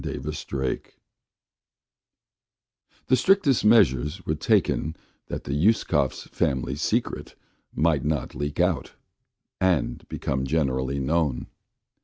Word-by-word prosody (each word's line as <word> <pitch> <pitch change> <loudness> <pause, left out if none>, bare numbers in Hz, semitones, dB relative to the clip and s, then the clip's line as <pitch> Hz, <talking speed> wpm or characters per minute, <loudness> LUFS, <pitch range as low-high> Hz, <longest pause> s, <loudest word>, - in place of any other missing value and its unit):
A - - -4
PROBLEM 65 -2 -3 2.3
THE 130 - +4
strictest 140 -1 +3
measures 85 - +3
were 75 - 0
taken 80 +1 +1 0.3
that - - -5
the - - -4
Uskovs' 75 - +1
family 65 0 -1
secret 75 - -2 0.4
might 75 -2 +1
not 75 -1 -2
leak 75 0 -4
out - - +1 0.7
and 95 -5 +1
become 65 -1 -2
generally 65 -3 0
known. 70 0 0
75 Hz, 100 wpm, -25 LUFS, 65-85 Hz, 2.3 s, THE